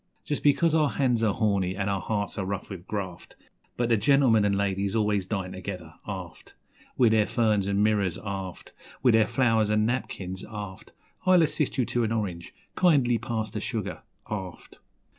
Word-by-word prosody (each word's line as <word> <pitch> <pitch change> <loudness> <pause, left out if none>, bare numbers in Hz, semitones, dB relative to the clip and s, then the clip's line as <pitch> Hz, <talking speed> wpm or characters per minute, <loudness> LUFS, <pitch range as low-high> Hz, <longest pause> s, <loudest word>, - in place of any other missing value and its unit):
Just 145 - -2
because 155 +3 +3
our 155 -3 +3
hands 125 -5 +1
are 110 -2 +3
horny 100 -4 0
an' 100 0 -1
our 100 -2 0
hearts 100 +2 -2
are - - -1
rough 100 +1 -4
with 95 -1 -8
graft 95 -5 -5 0.4
But 120 -1 0
the 115 - +4
gentlemen 115 -2 +4
and 100 -1 +2
ladies 100 0 -1
always 105 -3 +1
DINE 95 -3 -3
together, 90 -3 -7
aft 95 -5 -8 0.4
With 120 -3 +5
their 110 -2 +3
ferns 110 -3 +1
an' 100 +1 +2
mirrors, 100 -5 +1
aft, 95 -2 -6 0.3
With 125 -3 +5
their 110 -1 +4
flow'rs 115 -3 +2
an' 105 0 +2
napkins, 95 -6 -3
aft 105 -3 -8 0.4
'I'll 180 -2 +6
assist 150 -2 -1
you 125 - +2
to 120 +1 0
an 110 - -1
orange' 95 -7 -3 0.2
'Kindly 135 -10 +3
pass 110 -1 -3
the - - -4
sugar', - - -4 0.3
aft. 95 -5 -7
105 Hz, 180 wpm, -27 LUFS, 95-120 Hz, 0.4 s, I'll